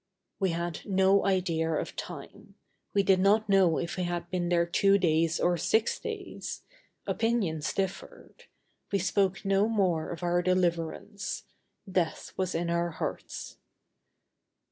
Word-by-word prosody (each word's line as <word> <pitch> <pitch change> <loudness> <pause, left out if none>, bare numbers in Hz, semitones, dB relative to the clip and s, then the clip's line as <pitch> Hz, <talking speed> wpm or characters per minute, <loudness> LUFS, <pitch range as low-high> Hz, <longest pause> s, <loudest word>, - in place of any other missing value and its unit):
We 190 - +2
had 170 0 -2
no 195 0 +3
idea 170 -4 +1
of 155 - -2
time. 200 +5 -9 0.4
We 200 - +2
did 190 -1 +4
not 205 +3 +4
know 190 -5 +4
if 170 +1 -3
we 180 - 0
had 175 0 -3
been 175 -2 -1
there 170 -1 +3
two 195 +3 +4
days 165 -3 +2
or 175 0 +2
six 220 +7 +1
days. - - -6 0.4
Opinions 200 -10 0
differed. 195 -1 -5 0.5
We 200 - +2
spoke 195 0 0
no 195 +2 +3
more 185 -7 +1
of 170 +1 -6
our 175 0 +2
deliverance. 185 +2 -1 0.4
Death 180 -4 -1
was 185 -1 -1
in 170 +1 -1
our 170 0 +1
hearts. 165 - -5
180 Hz, 140 wpm, -29 LUFS, 170-195 Hz, 0.5 s, did